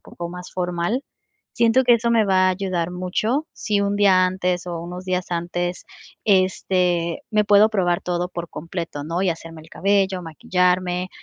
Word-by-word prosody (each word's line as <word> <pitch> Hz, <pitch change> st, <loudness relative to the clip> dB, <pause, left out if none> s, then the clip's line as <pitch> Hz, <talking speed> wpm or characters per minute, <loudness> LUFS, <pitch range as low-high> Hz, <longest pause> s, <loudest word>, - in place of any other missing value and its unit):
poco 170 Hz, 0 st, -8 dB
más 180 Hz, +1 st, -9 dB
formal, 180 Hz, +7 st, -1 dB, 0.5 s
siento 235 Hz, +2 st, +3 dB
que 245 Hz, -1 st, +5 dB
eso 235 Hz, 0 st, 0 dB
me 225 Hz, -2 st, +4 dB
va 185 Hz, -1 st, +3 dB
a -, -, +4 dB
ayudar 180 Hz, -2 st, -2 dB
mucho, 215 Hz, -, -1 dB
si 205 Hz, -2 st, -1 dB
un 200 Hz, 0 st, 0 dB
día 190 Hz, -3 st, +5 dB
antes 180 Hz, -1 st, -1 dB
o 170 Hz, -1 st, -4 dB
unos 180 Hz, +2 st, -7 dB
días 185 Hz, -1 st, -1 dB
antes, 175 Hz, +1 st, -3 dB, 0.4 s
este, 180 Hz, -3 st, +1 dB
me 210 Hz, 0 st, +4 dB
puedo 205 Hz, +1 st, +6 dB
probar 180 Hz, -5 st, +1 dB
todo 180 Hz, 0 st, -2 dB
por 170 Hz, -2 st, -6 dB
completo, 165 Hz, -2 st, -6 dB
¿no?, 165 Hz, +5 st, -2 dB
y 185 Hz, -, +2 dB
hacerme 165 Hz, -1 st, -7 dB
el 160 Hz, -, -16 dB
cabello, 195 Hz, -1 st, +1 dB
maquillarme, 180 Hz, +2 st, 0 dB
180 Hz, 170 wpm, -22 LUFS, 175-200 Hz, 0.5 s, puedo